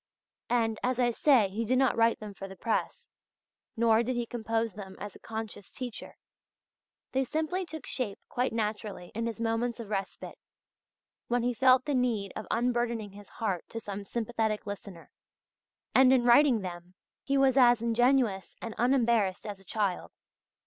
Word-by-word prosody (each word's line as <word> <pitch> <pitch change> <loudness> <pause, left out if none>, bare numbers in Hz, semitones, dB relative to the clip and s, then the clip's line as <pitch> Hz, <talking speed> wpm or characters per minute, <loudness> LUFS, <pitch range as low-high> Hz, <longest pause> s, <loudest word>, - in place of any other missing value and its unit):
And, 225 -2 +1
as 255 0 0
I 245 -1 +3
say, 240 -5 +4
he 215 +4 -2
did 250 +3 +1
not 265 -1 +3
write 230 0 +3
them 210 -1 -8
for 195 0 -8
the 190 - -10
press, 225 +4 -2 0.7
nor 225 -1 +4
did 250 +2 -2
he 240 0 -1
compose 225 -2 -2
them 195 -2 -9
as 205 -1 -7
a - - -13
conscious 220 -3 -7
teacher. 250 -4 -7 0.9
They 265 +1 +1
simply 320 +7 -2
took 315 -3 -8
shape 225 -7 -3
quite 250 +1 -1
naturally 210 -4 -3
in 230 +2 -2
his 230 0 -5
moments 230 +1 -1
of 220 -3 -7
respite, 195 -1 -4 0.9
when 240 0 +1
he 245 0 +1
felt 255 +1 +4
the 295 - -1
need 235 -7 0
of 215 - -6
unburdening 235 -3 0
his 205 +1 -12
heart 195 -6 -2
to 230 - -5
some 205 -2 -6
sympathetic 220 0 -2
listener; 200 -4 -8 0.8
and 260 0 +6
in 260 -2 +4
writing 245 -1 +6
them 180 0 -8 0.3
he 275 0 0
was 270 -1 +4
as 245 -3 +6
ingenuous 235 -5 +2
and 225 - -6
as - - -17
unembarrassed 235 -6 +2
as 205 -2 -6
a - - -18
child. 195 -1 -2
230 Hz, 170 wpm, -29 LUFS, 205-245 Hz, 0.9 s, and